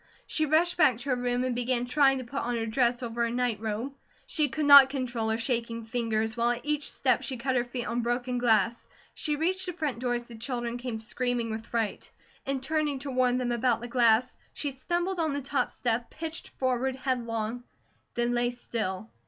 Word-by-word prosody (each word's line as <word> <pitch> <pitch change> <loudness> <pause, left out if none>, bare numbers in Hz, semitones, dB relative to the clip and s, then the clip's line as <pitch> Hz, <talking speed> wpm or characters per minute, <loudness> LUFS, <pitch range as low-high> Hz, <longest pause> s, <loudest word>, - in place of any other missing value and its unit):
She 310 -1 +1
rushed 335 +4 +3
back 265 -9 +5
to 270 +3 -3
her - - +3
room 245 0 0
and 255 -1 0
began 245 0 0
trying 270 +1 +4
to 260 - -4
put 270 +3 -4
on 240 0 -1
her 225 - -1
dress 240 +2 +1
over 235 0 -3
her - - -1
nightrobe. 230 +1 -2 0.3
She 305 -5 +1
could 305 +3 -2
not 280 -2 +10
control 245 -5 -2
her 220 - +1
shaking 230 -1 -2
fingers, 225 -1 -1
while 235 0 +2
at 240 0 -1
each 300 0 0
step - - +2
she 260 - -3
cut 260 +2 -1
her 245 - +3
feet 245 0 -5
on 240 +1 -1
broken 245 +1 -1
glass. 225 -2 +2 0.3
She 300 -1 -1
reached 370 +5 0
the 360 - -3
front 300 -8 -3
door 245 -1 0
as 240 - -3
the 235 - -11
children 240 0 -3
came 240 -2 -4
screaming 235 +1 -1
with 220 +1 -5
fright. 225 -3 -2 0.4
In 270 -1 -1
turning 300 0 0
to 275 - -3
warn 250 -1 +2
them 250 -1 -1
about 240 -1 +1
the 240 - -6
glass, 235 0 +3 0.2
she 290 - -2
stumbled 345 +7 -2
on 315 -3 +1
the 285 - -2
top 275 +1 0
step, 235 -1 -2
pitched 325 +1 -6
forward 260 0 -1
headlong, 240 -3 -2 0.5
then 240 0 +1
lay 240 0 +2
still. 205 - -4
245 Hz, 210 wpm, -28 LUFS, 235-270 Hz, 0.5 s, not